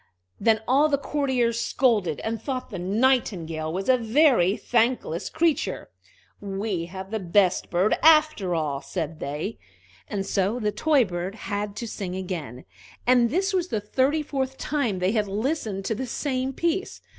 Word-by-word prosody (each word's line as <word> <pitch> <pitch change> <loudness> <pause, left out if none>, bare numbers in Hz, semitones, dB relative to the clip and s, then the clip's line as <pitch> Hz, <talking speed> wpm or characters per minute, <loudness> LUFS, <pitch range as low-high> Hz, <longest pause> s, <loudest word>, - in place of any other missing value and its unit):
Then 220 -2 +3
all 285 +4 +4
the 280 - +2
courtiers 260 -5 0
scolded, 215 - +1
and 225 0 -3
thought 255 -3 -4
the 190 - -5
Nightingale 185 -7 0
was 190 +3 -3
a 260 -1 +5
very 230 - +3
thankless 235 -8 0
creature. 320 -2 0 0.5
"We 195 -3 -3
have 190 +2 -8
the 220 - -1
best 185 0 +2
bird, 180 +5 +2
after 305 - +4
all," 145 -4 -1
said 155 +2 -4
they. 150 +10 -4 0.5
And 195 -1 -3
so 200 +6 0
the 210 -2 0
toy 290 0 +3
bird 180 +1 -4
had 205 -1 -4
to 235 +3 -5
sing 185 -4 -5
again, 165 - -5 0.4
and 245 -1 +4
this 385 - 0
was 365 -2 +1
the 220 - -1
thirty 265 +9 +1
fourth 265 -2 -3
time 260 -9 -1
they 185 +1 +1
had 210 -2 0
listened 215 -2 -2
to 220 - 0
the 255 +4 -4
same 260 +1 -2
piece. 340 +6 -2
220 Hz, 160 wpm, -25 LUFS, 185-265 Hz, 0.5 s, a